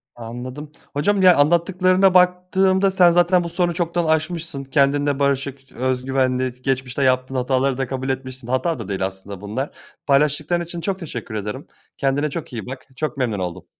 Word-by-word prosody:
Anladım, 125 +5 -7 0.2
hocam 195 +8 +1
ya 180 -2 +7
anlattıklarına 180 +5 +3
baktığımda 185 +1 +3
sen 180 -2 +5
zaten 175 +1 +3
bu 170 - -4
sorunu 175 0 0
çoktan 170 0 -1
aşmışsın, 160 -2 -1
kendinle 140 +1 +1
barışık, 140 -1 -1
öz 130 0 -2
güvenli. 130 -1 0
Geçmişte 130 0 -1
yaptığın 130 0 +1
hataları 130 +1 +1
da 135 -1 -1
kabul 130 +1 -4
etmişsin 130 -2 -5
hata 130 +4 0
da 110 - -6
değil 95 -1 -1
aslında 95 0 -7
bunlar. 110 +8 -3 0.4
Paylaştıkların 150 +4 +2
için 170 0 -7
çok 195 +1 -2
teşekkür 150 - -6
ederim. 105 +6 -5 0.3
Kendine 140 +2 0
çok 165 -1 -6
iyi 110 -5 -5
bak, 130 +1 -8
çok 155 +1 -3
memnun 120 -6 -1
oldum. 90 -2 -5
140 Hz, 165 wpm, -21 LUFS, 130-170 Hz, 0.4 s, ya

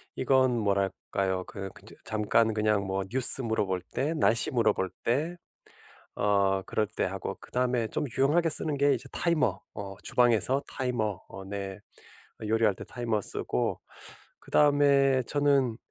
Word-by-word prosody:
이건 130 -2 +2
뭐랄까요. 95 -2 -1
그 95 -1 -7
그저 - - -16
잠깐 110 +1 +1
그냥 105 -2 0
뭐 95 0 -2
뉴스 130 +2 +8
물어볼 100 -5 -1
때 150 +5 -1
날씨 115 -7 +3
물어볼 115 -6 +1 0.2
때 155 +9 -1 0.8
어 100 -1 +1
그럴 110 - -1
때 - - -1
하고 95 0 -5
그다음에 125 -2 -1
좀 - - -3
유용하게 160 +5 +2
쓰는 150 -1 +1
게 140 0 +3
이제 - - -7
타이머. 150 - 0
어. 100 -2 -7
주방에서 125 +2 +2
타이머 110 -7 -3
어 95 - -10
네 100 -1 -6 0.7
요리할 110 -2 +2
때 - - -11
타이머 115 -3 -3
쓰고. 60 -9 -2 0.6
그다음에 140 -2 +3
저는 140 -5 +1
115 Hz, 280 characters per minute, -27 LUFS, 100-135 Hz, 0.8 s, 뉴스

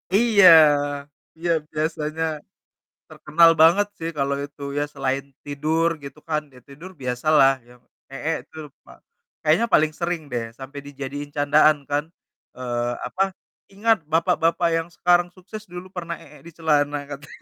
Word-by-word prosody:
Iya 210 -3 +6 0.9
iya 170 +1 -1 0.2
biasanya 155 0 -2 0.9
terkenal 165 +2 +4
banget 175 +6 +5
sih 165 0 -4
kalau 140 0 0
itu, 145 0 -17 0.2
ya 145 - +1
selain 135 0 -2 0.2
tidur 155 +3 0
gitu 140 +2 -10
kan, 155 -1 0
ya 125 - -15
tidur 150 +7 -11
biasa 125 +3 -4
lah 135 0 +6
ya. 120 - -17 0.4
Eek 160 +4 -2
tuh 160 0 -8 0.2
pa - - -15 0.5
kayaknya 160 +8 +3
paling 155 0 +4
sering 170 -1 -2
deh, 120 -2 -2 0.2
sampai 135 +2 -8
dijadiin 145 +1 -6
candaan 150 +1 +4
kan, 145 +1 0 0.5
eee, 120 -1 -2 0.2
apa 185 +10 0 0.5
"Ingat 220 +3 +2
bapak-bapak 170 +1 +2
yang 165 0 -3
sekarang 175 0 +3
sukses, 210 +3 -10
dulu 180 +1 -8
pernah 170 -1 -4
eek - - -16
di - - -11
celana," 145 -3 +1
katanya. 145 +1 -10
155 Hz, 145 wpm, -23 LUFS, 140-170 Hz, 0.9 s, Iya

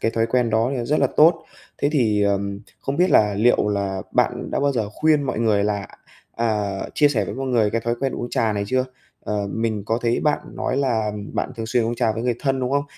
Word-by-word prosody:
cái 115 - +1
thói 115 0 0
quen 120 0 +1
đó 110 +2 +2
thì 135 - -2
nó 120 - -2
rất 150 +5 +1
là - - +4
tốt. 160 +1 +5 0.3
Thế 145 - +1
thì, 110 -7 +2
ờm, 100 0 -1 0.2
không 135 - -3
biết 180 +2 +3
là 105 -1 +4
liệu 105 0 +3
là 100 -2 -2
bạn - - 0
đã - - -1
bao 140 0 +2
giờ 115 -5 -1
khuyên 155 +4 +2
mọi 130 -5 -2
người 105 -3 +2
là 100 -2 -1 0.5
à, 105 -3 0 0.2
chia 145 -1 +5
sẻ 125 -7 0
với - - -5
mọi 135 +1 -4
người 115 -5 +2
cái 115 - -1
thói 120 +1 -1
quen 135 -1 0
uống 120 - -5
trà 115 -5 +1
này 100 -1 -2
chưa? 130 +3 +1 0.4
Ờ, 105 -1 -2
mình 110 -2 -2
có 115 +1 0
thấy 120 0 +1
bạn 150 -1 +2 0.2
nói 130 - -1
là 115 -6 0 0.2
bạn - - -2
thường 115 - -4
xuyên 115 0 +1
uống 115 - -1
trà 115 -2 +1
với 115 - -4
người 120 -1 +1
thân, 135 -2 0
đúng 125 0 -1
không? 140 +1 +1
115 Hz, 255 wpm, -22 LUFS, 105-130 Hz, 0.5 s, tốt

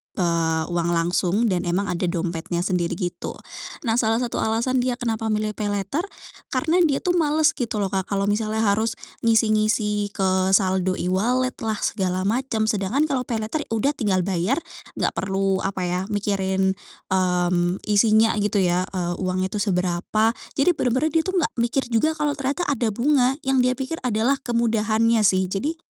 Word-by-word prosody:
eee, 165 -3 +1
uang 170 0 0
langsung 180 +6 +1
dan 180 -1 -1
emang 185 +3 0
ada 180 0 -1
dompetnya 170 0 -2
sendiri 180 -2 0
gitu, 175 -1 -4 0.5
nah 230 -1 +1
salah 225 +1 +1
satu 240 - -2
alasan 230 +4 0
dia 250 0 0
kenapa 225 -3 -2
milih 215 0 0
paylater 205 - -1 0.5
karena 320 +7 +2
dia 280 -3 +1
tuh 355 - +1
males 310 0 +3
gitu 230 -3 -3
loh 195 - 0
Kak, 190 -1 -1
kalau 200 -1 0
misalnya 215 +1 0
harus, 220 +2 +1 0.3
ngisi-ngisi 215 -2 +2
ke 190 0 +1
saldo 185 -2 +1
e-wallet 245 +8 0
lah, 220 -1 -1
segala 185 -1 -1
macam 230 0 0
sedangkan 210 +8 +1
kalau 255 -2 -1
paylater 225 +6 -2
udah 250 +6 +2
tinggal 195 -8 0
bayar, 190 +6 0 0.4
enggak - - +1
perlu 195 0 0
apa 190 -1 -2
ya 180 +1 -1
mikirin, 190 -2 0 0.4
mmm, 180 -1 +1
isinya 215 +2 +4
gitu 205 0 0
ya, 180 +1 +1
eee, 175 -1 -1
uangnya 185 0 -1
itu 210 - -2
seberapa 185 +3 +1 0.3
jadi 285 +6 +4
benar-benar 260 +3 0
dia 325 - +4
tuh 375 - -2
enggak 330 - 0
mikir 240 +3 +1
juga 310 +8 +2
kalau 295 -1 0
ternyata 280 +6 -1
ada 245 -4 0
bunga 255 +3 +2
yang 265 -1 +2
dia 255 0 +2
pikir 275 +5 -4
adalah 250 +3 +1
kemudahannya 230 -1 +1
sih, 190 -1 +3
jadi, 290 +11 -1
215 Hz, 165 wpm, -23 LUFS, 185-245 Hz, 0.5 s, isinya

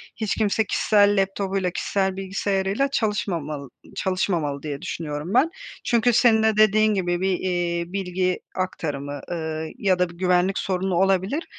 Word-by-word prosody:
hiç 220 -3 -2
kimse 220 0 +1
kişisel 205 0 +3
laptopuyla, 195 -1 -1
kişisel 190 +1 -1
bilgisayarıyla 195 +5 -1
çalışmamal 165 - -2 0.3
çalışmamalı 170 -7 -1
diye 145 -2 -5
düşünüyorum 150 +2 -4
ben. 280 +7 +4 0.3
Çünkü 240 +1 +2
senin 225 -2 +4
de 220 -1 +2
dediğin 215 0 +4
gibi 175 -3 -1
bir, 190 -1 +1
eee, 175 -2 -1
bilgi 185 -1 -1 0.2
aktarımı, 145 -6 -3
ııı, 160 -2 -3
ya 185 -2 +1
da 180 - +2
bir 170 - -14
güvenlik 180 +1 +2
sorunu 185 -1 -1
olabilir. 195 - +1
190 Hz, 140 wpm, -23 LUFS, 175-205 Hz, 0.3 s, ben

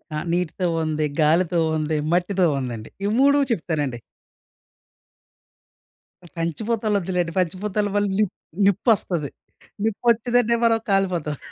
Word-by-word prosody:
ఆ! - - -1 0.2
నీటితో 180 +1 -1 0.2
ఉంది, 155 -1 -1 0.2
గాలితో 170 +3 +3 0.2
ఉంది, 155 0 -1
మట్టితో 180 +1 +2
ఉందండి. 120 -4 -5 0.2
ఈ - - +2
3 280 +1 +5
చెప్తానండి. 155 - -1 2.4
పంచభూతాలు 210 +6 -1
వద్దులేండి. 180 -2 -1
పంచభూతల 195 +4 -1
వల్ల 205 0 +2
నిప్ 210 -4 +1 0.3
నిప్పొస్తది. 195 - +1 0.5
నిప్పొచ్చిందంటే 235 +2 +2
మనం 225 -1 +3
కాలిపోతాం. 180 -7 0
180 Hz, 100 wpm, -23 LUFS, 160-215 Hz, 2.4 s, 3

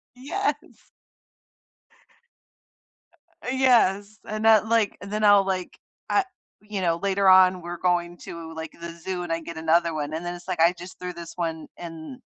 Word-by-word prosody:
Yes. 340 +11 -3 2.6
Eh, 250 - -3
yes, 215 -5 +3
and 215 +1 -3
that, 220 -1 +6
like 225 -3 +1
and 200 0 -8
then 215 0 -1
I'll, 205 -1 +6
like 185 -2 -3 0.3
I 395 - +3 0.4
you 210 -2 -5
know, 170 -2 +1
later 195 0 +1
on, 185 -1 +6
we're 175 +1 -6
going 175 -1 0
to, 165 -1 -9
like, 160 -1 -6
the 170 0 -6
zoo 180 +1 -5
and 170 - -5
I 165 - -1
get 165 0 -8
another 165 +1 +2
one, 150 0 -3
and 165 +2 -3
then 175 0 -4
it's, 175 - -13
like, - - -3
I 170 +2 +5
just 180 +2 -11
threw 180 0 -4
this 170 -1 -9
one 165 -3 -3
in 165 +8 -9
180 Hz, 175 wpm, -25 LUFS, 170-205 Hz, 2.6 s, that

